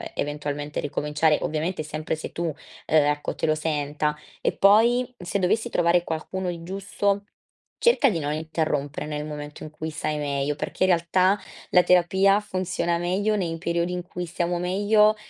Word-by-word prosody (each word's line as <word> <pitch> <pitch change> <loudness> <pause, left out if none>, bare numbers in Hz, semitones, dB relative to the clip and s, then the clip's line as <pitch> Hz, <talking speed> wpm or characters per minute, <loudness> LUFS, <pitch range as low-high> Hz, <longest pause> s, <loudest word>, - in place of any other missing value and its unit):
eventualmente 145 0 -3
ricominciare. 150 +2 +1
Ovviamente 155 +2 -2
sempre 155 +1 -3
se 155 - -7
tu, 170 - -4
uhm, 160 - -1 0.3
ecco, 150 -1 +2
te - - -1
lo 155 0 +2
senta, 150 -1 -1 0.3
e - - +1
poi, 210 +4 +7 0.3
m - - -11
se 175 +3 -1
dovessi 220 +6 +1
trovare 175 -1 +3
qualcuno 180 +3 -3
di 170 -1 -5
giusto, 200 +2 -1 0.5
cerca 475 - +4
di 170 -6 -1
non 145 0 -2
interrompere 155 -2 -2
nel 150 0 -3
momento 150 -1 -7
in 155 - -7
cui 155 +1 -5
sai 155 -1 -2
meglio, 140 0 -1
perché, 185 - -2
in 185 - +4
realtà, 185 +3 +3 0.3
la 180 - +6
terapia 190 +3 +4
funziona 185 -3 -1
meglio 190 +5 0
nei 165 -4 -2
periodi 170 +1 -1
in 180 - -2
cui 180 0 -5
stiamo 175 +1 -2
meglio 205 +4 +3
170 Hz, 170 wpm, -25 LUFS, 150-185 Hz, 0.5 s, poi